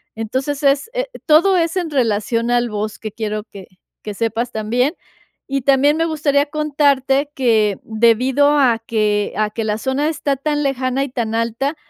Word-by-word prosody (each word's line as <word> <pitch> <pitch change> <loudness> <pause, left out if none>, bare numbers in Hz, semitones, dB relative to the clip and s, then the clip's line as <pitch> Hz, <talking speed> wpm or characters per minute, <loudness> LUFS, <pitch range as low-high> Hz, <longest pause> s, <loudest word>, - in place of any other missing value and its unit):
Entonces, 260 +6 -3
es, 280 +9 +2
eh, - - -2 0.2
todo 345 +5 +4
es 330 0 0
en 355 -3 -1
relación 230 -3 0
al 240 0 +1
bosque, 215 +1 -5
quiero 215 -1 -4
que 195 -5 -12 0.4
que 210 - -5
sepas 230 +3 -2
también, 240 +6 0 0.5
y 275 0 -1
también 280 +3 +3
me 325 - +1
gustaría 290 -3 +1
contarte 285 -2 +1
que, 220 -7 +2
debido 235 +6 +2
a 245 -5 +4
que 210 -2 0
a 215 0 +1
que 225 +2 -4
la 215 0 -2
zona 265 +5 -1
está 290 -3 -1
tan 295 +2 -1
lejana 265 -1 -1
y 275 - -4
tan 235 -3 -3
alta, 235 +6 -1
255 Hz, 165 wpm, -18 LUFS, 225-285 Hz, 0.5 s, todo